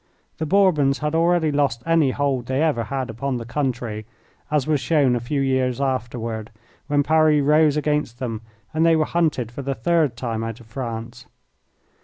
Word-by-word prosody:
The 160 Hz, -, -2 dB
Bourbons 155 Hz, -7 st, +3 dB
had 150 Hz, 0 st, -2 dB
already 165 Hz, -1 st, +2 dB
lost 140 Hz, -5 st, 0 dB
any 165 Hz, -4 st, +3 dB
hold 135 Hz, -3 st, -1 dB
they 130 Hz, +4 st, 0 dB
ever 120 Hz, -8 st, +1 dB
had 130 Hz, +2 st, -3 dB
upon 130 Hz, +3 st, -3 dB
the 115 Hz, -, -6 dB
country, 120 Hz, -5 st, -3 dB, 0.4 s
as 150 Hz, -3 st, +1 dB
was 155 Hz, -2 st, +1 dB
shown 140 Hz, -4 st, +2 dB
a -, -, 0 dB
few 135 Hz, +4 st, -2 dB
years 130 Hz, -2 st, 0 dB
afterward, 120 Hz, -4 st, -3 dB, 0.4 s
when 145 Hz, 0 st, +2 dB
Paris 155 Hz, -1 st, +3 dB
rose 150 Hz, +1 st, +4 dB
against 150 Hz, -5 st, -1 dB
them 115 Hz, -4 st, -4 dB, 0.3 s
and 160 Hz, +1 st, +1 dB
they 165 Hz, -1 st, +5 dB
were 155 Hz, -1 st, +2 dB
hunted 150 Hz, -10 st, 0 dB
for 130 Hz, -, -6 dB
the 135 Hz, 0 st, -3 dB
third 150 Hz, -1 st, +1 dB
time 115 Hz, -3 st, -3 dB
out 115 Hz, +1 st, -5 dB
of 120 Hz, -, -15 dB
France. 115 Hz, 0 st, -6 dB
135 Hz, 180 wpm, -22 LUFS, 120-150 Hz, 0.4 s, they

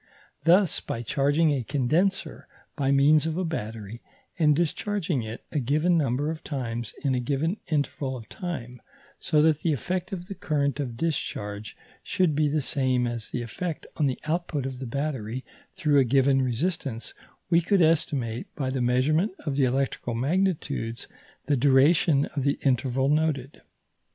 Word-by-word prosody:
Thus, 180 Hz, +1 st, +4 dB
by 115 Hz, -, -5 dB
charging 145 Hz, +6 st, +2 dB
a 140 Hz, -3 st, 0 dB
condenser 155 Hz, -, 0 dB, 0.3 s
by 135 Hz, -2 st, 0 dB
means 145 Hz, +3 st, +5 dB
of 160 Hz, +1 st, -2 dB
a 185 Hz, -, 0 dB
battery, 115 Hz, -7 st, -5 dB, 0.4 s
and 150 Hz, -2 st, +5 dB
discharging 175 Hz, -, -1 dB
it 110 Hz, +1 st, -7 dB
a 150 Hz, -, 0 dB
given 150 Hz, +7 st, +2 dB
number 145 Hz, 0 st, +1 dB
of 160 Hz, -, -7 dB
times 120 Hz, -5 st, -4 dB
in 140 Hz, -2 st, +2 dB
a 125 Hz, -, +1 dB
given 145 Hz, -, -1 dB
interval 140 Hz, -4 st, -1 dB
of 115 Hz, -3 st, -11 dB
time, 125 Hz, -9 st, -6 dB, 0.4 s
so 150 Hz, -1 st, +2 dB
that 155 Hz, -2 st, +3 dB
the 160 Hz, -1 st, +1 dB
effect 180 Hz, -, -3 dB
of 180 Hz, -2 st, -5 dB
the 200 Hz, -, -6 dB
current 140 Hz, -5 st, -1 dB
of 125 Hz, -5 st, -3 dB
discharge 110 Hz, -9 st, -3 dB, 0.2 s
should 185 Hz, -5 st, +1 dB
be 150 Hz, +1 st, +2 dB
the 150 Hz, 0 st, 0 dB
same 130 Hz, -3 st, +1 dB
as 120 Hz, -2 st, -3 dB
the 120 Hz, -, -3 dB
effect 160 Hz, +8 st, -5 dB
of 150 Hz, -, +2 dB
the 130 Hz, -, -1 dB
output 155 Hz, -3 st, -1 dB
of 130 Hz, -2 st, -5 dB
the 130 Hz, -, -5 dB
battery 130 Hz, -3 st, -3 dB, 0.3 s
through 145 Hz, -2 st, +3 dB
a -, -, +6 dB
given 135 Hz, +2 st, +3 dB
resistance, 130 Hz, -1 st, -2 dB, 0.4 s
we 170 Hz, 0 st, +5 dB
could 185 Hz, +1 st, +3 dB
estimate, 135 Hz, -7 st, +1 dB
by 130 Hz, -2 st, -2 dB
the 130 Hz, -1 st, -1 dB
measurement 145 Hz, -, +2 dB
of 145 Hz, -3 st, -1 dB
the 135 Hz, -1 st, +3 dB
electrical 130 Hz, -2 st, -1 dB
magnitudes, 140 Hz, -5 st, -1 dB, 0.4 s
the 145 Hz, -, +2 dB
duration 140 Hz, +3 st, +4 dB
of 140 Hz, -, -1 dB
the 140 Hz, +1 st, +1 dB
interval 130 Hz, 0 st, +1 dB
noted. 150 Hz, -3 st, 0 dB
140 Hz, 165 wpm, -26 LUFS, 125-160 Hz, 0.4 s, a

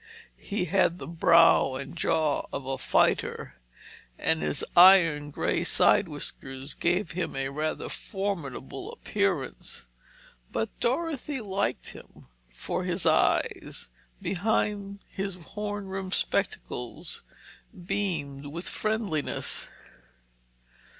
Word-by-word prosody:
He 200 Hz, -3 st, -2 dB
had 175 Hz, -1 st, +2 dB
the -, -, -7 dB
brow 165 Hz, -4 st, +5 dB
and 135 Hz, +5 st, -6 dB
jaw 155 Hz, -3 st, +1 dB
of 135 Hz, -, -4 dB
a 135 Hz, 0 st, -3 dB
fighter, -, -, +1 dB, 0.6 s
and 160 Hz, 0 st, +1 dB
his -, -, -1 dB
iron 170 Hz, -5 st, +7 dB
grey 145 Hz, -, 0 dB
side -, -, +4 dB
whiskers 135 Hz, +2 st, -6 dB
gave 175 Hz, 0 st, 0 dB
him 175 Hz, +1 st, -3 dB
a 135 Hz, 0 st, -1 dB
rather 155 Hz, +3 st, -2 dB
formidable 170 Hz, -, -4 dB
appearance. 190 Hz, -, -2 dB, 0.7 s
But 110 Hz, -, -1 dB
Dorothy 290 Hz, +1 st, -1 dB
liked 200 Hz, -2 st, -2 dB
him, -, -, -14 dB, 0.3 s
for -, -, -3 dB
his -, -, 0 dB
eyes, -, -, +1 dB, 0.3 s
behind 200 Hz, 0 st, -1 dB
his 195 Hz, -1 st, -4 dB
horn 205 Hz, +3 st, -5 dB
rimmed 190 Hz, 0 st, -3 dB
spectacles, -, -, -2 dB, 0.6 s
beamed 160 Hz, -8 st, -2 dB
with 165 Hz, +5 st, -6 dB
friendliness. 215 Hz, -8 st, -2 dB
175 Hz, 105 wpm, -28 LUFS, 145-200 Hz, 0.7 s, iron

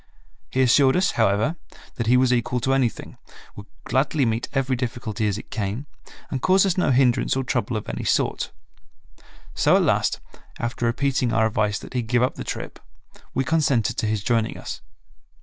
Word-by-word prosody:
He 130 Hz, -, +1 dB
assured 130 Hz, +2 st, +4 dB
us, 185 Hz, +2 st, +2 dB
however, 110 Hz, -, +1 dB, 0.4 s
that 115 Hz, -, -2 dB
he 125 Hz, +2 st, +5 dB
was 125 Hz, 0 st, +3 dB
equal 125 Hz, +1 st, 0 dB
to 135 Hz, +2 st, +1 dB
anything, 130 Hz, -4 st, -1 dB, 0.4 s
would 100 Hz, 0 st, -10 dB, 0.2 s
gladly 135 Hz, +1 st, +1 dB
meet 115 Hz, 0 st, -1 dB
every 135 Hz, -2 st, 0 dB
difficulty 120 Hz, -3 st, -3 dB
as 100 Hz, -1 st, -1 dB
it -, -, -11 dB
came, 110 Hz, +2 st, -3 dB, 0.5 s
and 130 Hz, -, -2 dB
cause 190 Hz, +1 st, +4 dB
us 190 Hz, -3 st, +1 dB
no 180 Hz, -, +1 dB
hindrance 125 Hz, -1 st, +3 dB
or 135 Hz, -, 0 dB
trouble 125 Hz, -2 st, -1 dB
of 105 Hz, -, -7 dB
any -, -, -4 dB
sort. -, -, 0 dB, 1.0 s
So -, -, +3 dB
at -, -, +4 dB
last, -, -, +1 dB, 0.4 s
after 120 Hz, 0 st, -2 dB
repeating 130 Hz, 0 st, 0 dB
our 110 Hz, -1 st, +3 dB
advice 105 Hz, -1 st, 0 dB
that -, -, -10 dB
he 125 Hz, -, 0 dB
give 120 Hz, +1 st, +1 dB
up 125 Hz, -, +1 dB
the -, -, -7 dB
trip, -, -, -6 dB, 0.6 s
we 135 Hz, -, +1 dB
consented 140 Hz, -6 st, +1 dB
to 110 Hz, -, 0 dB
his 105 Hz, -2 st, -1 dB
joining 115 Hz, -2 st, 0 dB
us. -, -, -7 dB
125 Hz, 185 wpm, -23 LUFS, 110-135 Hz, 1.0 s, he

